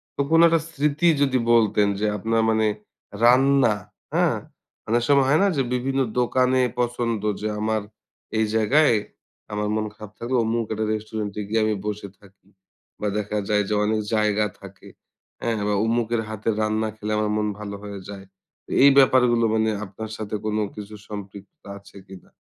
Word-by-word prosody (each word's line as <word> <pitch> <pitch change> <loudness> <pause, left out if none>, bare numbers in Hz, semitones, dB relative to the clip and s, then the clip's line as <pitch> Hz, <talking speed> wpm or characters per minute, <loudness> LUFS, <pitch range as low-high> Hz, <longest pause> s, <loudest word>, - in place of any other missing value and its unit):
তো - - -1
কোনো 165 0 +6
একটা 165 -1 +2
স্মৃতি 150 +1 0
যদি 135 -2 +2 0.2
বলতেন 105 -3 +3
যে, 105 - 0
আপনার 115 +3 0
মানে 110 0 +2 0.6
রান্না, 130 -1 +5 0.4
হ্যাঁ? - - +2 0.5
অনেক 120 +2 +1
সময় 140 -2 +4
হয় 150 +3 +4
না - - +4
যে, - - +3
বিভিন্ন 135 +2 -1 0.2
দোকানে 130 +1 +2 0.2
পছন্দ 120 -2 -1 0.2
যে, 105 - -1
আমার 110 0 0 0.6
এই 110 - +3
জায়গায় 130 +5 +4 0.6
আমার 105 0 -2
মন 110 0 -1
খারাপ 105 -1 -11
থাকলে 125 +2 -1
অমুক 115 +1 0
একটা 110 0 -2
রেস্টুরেন্ট 110 -1 -4
এ - - -4
গিয়ে 110 +1 +1
আমি 110 -1 0
বসে 105 -1 -4
থাকি। 95 -1 -22 0.5
বা 105 - 0
দেখা 105 0 -2
যায় 105 -1 +2
যে, - - 0
অনেক 110 0 0
জায়গা 105 0 +2 0.2
থাকে। 100 -1 -13 0.5
হ্যাঁ, 115 -1 -1
বা 105 - +1
অমুকের 115 0 0
হাতে 110 0 -3
রান্না 110 +1 0
খেলে 110 0 -4
আমার 105 0 0
মন 105 0 0
ভালো 100 -1 -6
হয়ে 100 -1 -7
যায়। 100 -1 -8 0.4
তো - - -22
এই 140 - +9
ব্যাপারগুলো 125 -3 +5
মানে, 110 0 +2 0.2
আপনার 105 +3 -8
সাথে 105 0 -4
কোনো 110 0 0
কিছু 105 0 -8
সম্পৃক্ততা 100 -1 -10
আছে 100 - -17
কিনা? 95 -1 -14
110 Hz, 170 wpm, -23 LUFS, 105-120 Hz, 0.6 s, এই